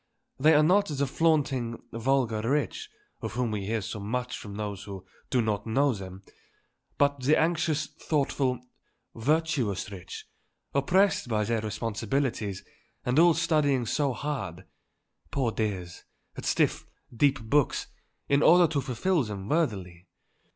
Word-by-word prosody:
They 155 +3 +6
are 150 - +6
not 200 +5 +4
the 140 -1 -1
flaunting, 135 -6 +1
vulgar 115 -2 +1
rich, 140 -6 -1 0.3
of - - -4
whom 120 -1 -1
we 100 -2 -3
hear 110 0 0
so 105 +2 -5
much 125 +5 -3
from 100 -2 -8
those 100 -2 -5
who 95 -2 -8 0.2
do 125 -2 +2
not 105 -1 -2
know 135 +4 +2
them, 95 -1 -8 0.7
but 140 0 +2
the 145 +5 +4
anxious, 160 -2 +1
thoughtful, 140 -4 -1 0.5
virtuous 135 - 0
rich, 90 -2 -8 0.5
oppressed 185 +5 +2
by 105 -2 +1
their 115 +1 0
responsibilities 110 -1 -2 0.4
and 125 +4 +2
all 170 -1 +6
studying 150 -6 +2
so 140 +4 +1
hard, 100 - -4 0.6
poor 130 -5 0
dears, 95 -6 -3 0.3
at - - -7
stiff, - - +1 0.3
deep 140 +2 +3
books, 125 +5 +1 0.4
in 140 +1 +3
order 175 +3 +7
to 140 - +1
fulfil 155 +8 0
them 100 -5 -5
worthily. 95 - -1
125 Hz, 135 wpm, -28 LUFS, 105-150 Hz, 0.7 s, order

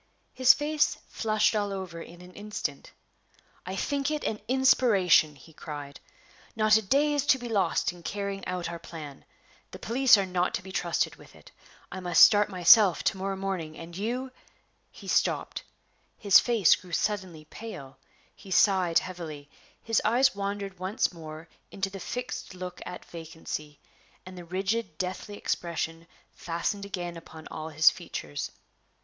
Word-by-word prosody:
His 255 0 +7
face 295 +1 +1
flushed 215 -1 +1
all 205 -1 0
over 185 -4 -6
in 170 +1 -12
an 180 0 -14
instant. 205 -9 -5 0.8
"I 185 - -4
think 280 +6 -1
it 305 -1 -2
an 215 - -2
inspiration!" 210 - +4
he 150 +4 -17
cried. 145 -2 -8 0.6
"Not 215 -1 +4
a 220 - +4
day 280 +8 +2
is 290 -2 +1
to 270 - +5
be 245 -1 -7
lost 195 -8 +1
in 175 - -14
carrying 200 +2 -4
out 180 -1 -3
our 170 0 -6
plan. 155 -4 -10 0.4
The - - -9
police 245 0 +5
are 200 - 0
not 180 -1 0
to - - -5
be 190 - -9
trusted 175 -2 -1
with - - -17
it. - - -17 0.4
I 190 - -5
must 180 -1 +5
start 205 -1 +6
myself 185 +1 +6
to - - +1
morrow 195 +1 -2
morning; 190 -5 -4
and 170 +1 -10
you 245 +7 -3 0.3
" - - -40 0.3
He - - -13
stopped; - - 0 0.6
his 200 -2 +7
face 230 -7 +4
grew 180 -2 -13
suddenly 185 -5 -2
pale; 150 -8 -9 0.4
he 195 - -14
sighed 185 -3 +3
heavily; 155 -6 -4 0.3
his 225 -1 +1
eyes 250 +5 +3
wandered 200 -1 -4
once 190 +4 -1
more 160 0 -9 0.2
into 195 0 -3
the 195 - -7
fixed 245 -3 -5
look 180 -1 -7
at 180 - -8
vacancy; 160 -3 -7 0.5
and 185 0 -10
the 175 -1 -9
rigid, 190 0 -2
deathly 185 +3 -4
expression 165 -1 -3 0.2
fastened 175 +4 -3
again 175 -3 -5
upon 160 -1 -12
all 155 0 -5
his 160 0 +6
features. 75 -1 -6
185 Hz, 160 wpm, -28 LUFS, 170-215 Hz, 0.8 s, His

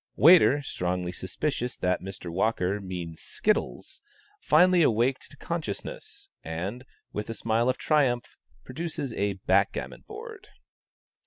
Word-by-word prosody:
Waiter, 150 -3 +7
strongly 90 -6 -2
suspicious 125 - -3
that 90 0 0
Mr. 95 -2 -7
Walker 95 +1 0
means 90 -4 -6
skittles, 215 0 -2 0.4
finally 180 - +5
awaked 125 -1 +2
to - - -15
consciousness, 160 -12 -5 0.2
and, 95 - -5 0.3
with 105 +1 -4
a 115 - -4
smile 115 +3 +1
of 130 - 0
triumph, 130 -6 +1 0.3
produces 145 -2 -4
a 100 -1 0
backgammon 95 - 0
board. - - -9
115 Hz, 115 wpm, -27 LUFS, 95-140 Hz, 0.4 s, Waiter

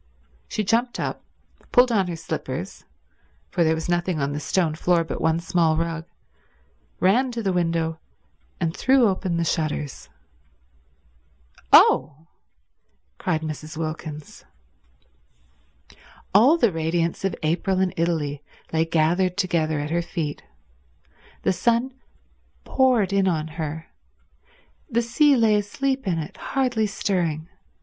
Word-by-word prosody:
She 215 - -2
jumped 230 +4 0
up, - - -3 0.5
pulled 250 -1 +5
on 195 -5 +2
her 175 - -3
slippers, 155 - -5 0.7
for 170 - +2
there 160 0 +2
was 160 +1 -4
nothing 175 -1 0
on 140 0 -1
the 145 - -3
stone 160 +1 0
floor 170 +1 +2
but 160 - -5
one 160 0 +2
small 170 -2 +1
rug, 165 0 -3 0.9
ran 245 +8 +3
to 230 -1 -4
the 190 -2 0
window 165 -2 0 0.6
and 165 -3 -1
threw 260 -2 +4
open 185 -3 -1
the 170 - +1
shutters. 155 -4 -3 1.6
"Oh!" 155 +2 +5 0.9
cried 160 -3 -1
Mrs. 155 0 -6
Wilkins. 155 -2 -6 1.9
All 250 - +6
the 235 - +3
radiance 165 +1 -1
of 195 - 0
April 180 +4 0
in 190 -2 +1
Italy 155 -4 -1 0.3
lay 160 0 +2
gathered 170 +3 +1
together 165 -5 0
at 150 +1 -4
her 170 +1 +1
feet. 160 -3 -4 1.0
The - - +2
sun 235 +7 +1 0.7
poured 245 -8 +2
in 195 -1 +3
on 160 -3 -1
her. 160 0 -5 1.0
The 235 -2 +1
sea 280 +5 +4
lay 225 -3 +4
asleep 265 +5 -2
in 175 -3 +1
it, 155 -1 -6
hardly 250 -5 0
stirring. 175 -5 -2
170 Hz, 125 wpm, -23 LUFS, 160-205 Hz, 1.9 s, All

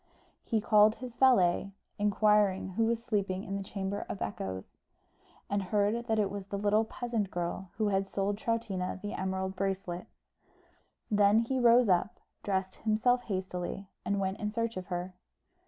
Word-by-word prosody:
He 225 - 0
called 215 0 +5
his 250 -2 -8
valet, 195 -7 +4 0.3
inquired 205 -2 +3
who 225 +5 +1
was 230 0 0
sleeping 200 -5 -1
in 195 - -4
the 200 - -2
Chamber 195 +1 -3
of 195 - -4
Echoes, 95 -2 -5 0.7
and 205 0 0
heard 210 +4 0
that 220 -1 +1
it 205 -2 +1
was 200 -1 -6
the 200 - -3
little 210 +2 +2
peasant 230 -3 -2
girl 175 +1 -3
who 215 -2 +1
had 195 0 +1
sold 200 +1 -1
to - - -16
Troutina 195 -6 -2
the 205 +2 -5
emerald 190 0 -2
bracelet. 190 -2 -3 1.0
Then 205 0 +5
he 240 +3 +1
rose 240 0 +6
up, 190 +5 +1 0.2
dressed 190 -1 -2
himself 225 +3 +2
hastily, 185 -1 -4
and 200 0 0
went 190 0 -2
in 210 - -1
search 230 +1 -2
of 185 -1 -5
her. 180 0 -4
200 Hz, 165 wpm, -31 LUFS, 190-220 Hz, 1.0 s, rose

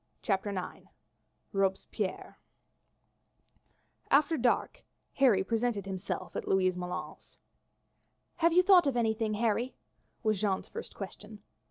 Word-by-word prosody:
CHAPTER 195 -1 0
IX 190 -3 -6 0.7
Robespierre 195 +1 -2 1.7
After 295 +3 +4
dark 255 - 0 0.3
Harry 235 -9 +4
presented 225 -1 -1
himself 190 0 -5
at - - -4
Louise 185 -1 +2
Moulin's. 180 0 -7 1.0
"Have 335 0 +4
you 360 +2 +5
thought 365 -4 +6
of 265 -3 0
anything, 220 -2 0
Harry?" 230 +3 0 0.5
was 215 -3 +1
Jeanne's 195 -3 0
first - - -8
question. 210 +1 -9
215 Hz, 110 wpm, -31 LUFS, 195-245 Hz, 1.7 s, thought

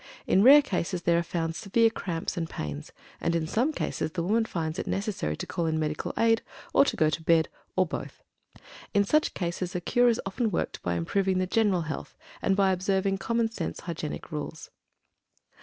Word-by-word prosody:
In 190 - +4
rare 285 +6 +9
cases 180 -6 -2
there 170 0 +3
are - - +1
found 165 -1 -2
severe 225 +5 +2
cramps 170 -7 -3
and 165 -2 -3
pains, 75 -1 -6 0.3
and 170 - 0
in 165 -1 0
some 240 - +1
cases 160 - -3
the 170 - -1
woman 220 +5 +2
finds 160 -6 -3
it - - -4
necessary 195 - -2
to - - -4
call 170 -3 -2
in 160 0 0
medical 155 -1 -2
aid, 225 0 +3 0.3
or - - +7
to - - 0
go 155 -1 +3
to 165 - -2
bed, 160 0 +3 0.3
or 185 - +4
both. 170 - -7 0.7
In 200 - +5
such 305 +10 +1
cases 180 +1 -3
a - - +1
cure 245 +7 +3
is 230 - +1
often 220 +4 -1
worked 180 - -2
by 90 -1 -1
improving 190 - 0
the 185 - +1
general 200 -2 +2
health, 155 -2 -6 0.2
and 195 - +2
by 195 -1 +3
observing 190 +1 0
common 230 +4 0
sense 175 -8 -4
hygienic 165 -1 -5
rules. 155 +1 -6
180 Hz, 195 wpm, -28 LUFS, 165-205 Hz, 0.7 s, rare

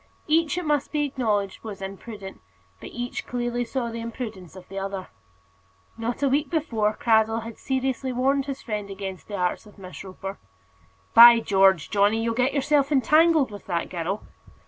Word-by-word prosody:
Each, 320 0 +2
it 360 - -2
must 295 -2 0
be 295 -1 +1
acknowledged, 215 -8 -1
was 210 -3 -7
imprudent; 195 +1 -8 0.4
but - - -9
each 245 +1 -5
clearly 240 0 -2
saw 240 -1 -3
the 230 0 -5
imprudence 220 -7 -7
of 185 -1 -12
the 195 0 -6
other. 195 -1 -5 0.9
Not 230 +4 -3
a - - +4
week 280 +2 +1
before 235 -10 0
this, - - -19
Cradell 225 0 +2
had 230 -1 -9
seriously 265 0 -2
warned 270 +2 +1
his 275 -1 -5
friend 210 -3 -4
against 195 -1 -7
the 205 - -5
arts 180 +3 -2
of 210 - -17
Miss 185 -2 -9
Roper. 195 +1 -8 0.7
"By 235 0 +10
George, 195 -6 +3
Johnny, 210 +2 +3
you'll 230 0 0
get 250 +3 +1
yourself 280 0 +2
entangled 305 0 +4
with 205 - -10
that 170 -3 -2
girl." 180 +3 -3
230 Hz, 175 wpm, -25 LUFS, 195-265 Hz, 0.9 s, By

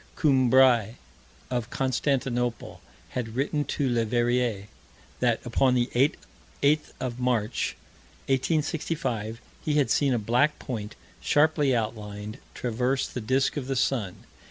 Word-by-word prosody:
Coumbray, 130 - +4 0.6
of 120 -2 -2
Constantinople, 130 -2 -1 0.3
had 115 -3 -4
written 145 +3 0
to 140 - -1
Leverrier, 120 -2 +1 0.5
that, 120 -2 +2
upon 125 +2 +2
the 120 0 +1
8th 145 +2 0
of 125 -1 -4
March, 120 -4 0 0.5
1865, 135 -5 -1 0.2
he 150 - 0
had 145 -3 +2
seen 140 -3 +3
a - - +1
black 125 +7 +2
point, 110 -5 -6 0.3
sharply 145 -3 +3
outlined, 105 -2 -4 0.2
traverse 125 +3 0
the 125 - -6
disk 130 +6 +1
of 135 -3 -3
the 135 - -1
sun. 120 -7 -1
125 Hz, 115 wpm, -27 LUFS, 115-135 Hz, 0.6 s, Coumbray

